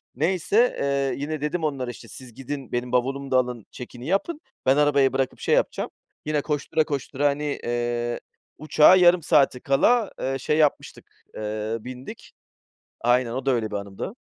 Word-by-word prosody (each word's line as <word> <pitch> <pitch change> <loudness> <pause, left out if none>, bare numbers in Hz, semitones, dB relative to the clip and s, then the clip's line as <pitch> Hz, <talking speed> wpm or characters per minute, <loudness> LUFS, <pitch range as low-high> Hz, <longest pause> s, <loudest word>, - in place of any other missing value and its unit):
neyse, 185 - +2
eee, 140 0 -1
yine 155 0 -3
dedim 155 +3 -2
onlara, 135 -5 -2
işte, - - -13
siz 130 -3 -11
gidin 135 +2 -7
benim 120 0 -2
bavulumu 135 +2 -1
da 130 - +4
alın 125 -3 -1
check-in'i 125 +1 -9
yapın. 290 - -1 0.2
Ben 130 +2 +4
arabayı 140 -3 +3
bırakıp 135 -1 -1
şey - - +2
yapacağım. - - 0 0.4
Yine 150 -1 0
koştura, 150 +1 0
koştura, 145 -1 -1
hani, 145 +1 -2
eee, 120 0 -2 0.4
uçağa 155 +3 +6
yarım 175 -2 +5
saati 140 -6 +3
kala, 215 - +2
eee, 135 0 -1
şey 150 +4 0
yapmıştık, 150 -2 0 0.3
eee, 110 +1 -3
bindik. 125 +3 -10 0.7
Aynen 120 0 +2
o 130 +2 -4
da - - +4
öyle 115 -3 -1
bir 105 - -3
anımdı. 100 - -6
135 Hz, 165 wpm, -24 LUFS, 125-150 Hz, 0.7 s, uçağa